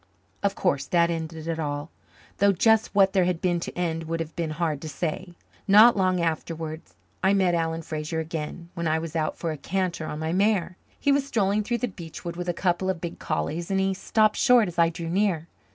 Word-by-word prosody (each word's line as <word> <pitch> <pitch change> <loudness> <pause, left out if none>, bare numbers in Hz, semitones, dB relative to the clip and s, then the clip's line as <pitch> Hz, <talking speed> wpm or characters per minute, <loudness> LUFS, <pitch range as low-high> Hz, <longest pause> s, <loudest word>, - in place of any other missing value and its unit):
Of 200 -1 0
course 140 -7 0
that 170 -1 +3
ended 160 -1 -5
it 165 -1 -2
all 145 0 -3 0.5
though 200 +1 +5
just 220 +3 +3
what 195 -1 +5
there 190 -3 +3
had 180 -2 0
been 175 -1 +1
to 170 - -7
end 165 -2 -1
would 165 +1 -3
have 165 -1 -5
been 170 -2 -2
hard 155 -2 -2
to 155 - -6
say. 175 +3 -4 0.3
Not 215 +4 +8
long 185 -2 +2
afterwards 160 -1 -3 0.3
I 195 +1 +4
met 185 -3 +3
Alan 165 -1 -1
Fraser 155 0 -3
again, 160 +1 -5
when 170 -2 -2
I 155 +1 +2
was 160 0 -5
out 155 -1 -1
for 165 - -2
a 155 - -5
canter 175 +1 -2
on 150 - -5
my 160 +1 -2
mare. 195 -2 +1 0.2
He 285 - +2
was 280 0 +2
strolling 205 -4 +1
through 240 +3 -1
the - - -3
beech 170 -6 -10
wood 170 0 -4
with 175 0 -4
a - - +4
couple 175 +1 0
of 185 -3 -1
big 170 0 -6
collies, 160 +2 -2
and 195 0 +1
he 190 0 +1
stopped 215 +3 +2
short 245 -5 +5
as 175 -1 -5
I 165 0 +5
drew 165 0 -6
near. 175 -2 0
170 Hz, 225 wpm, -26 LUFS, 160-190 Hz, 0.5 s, Not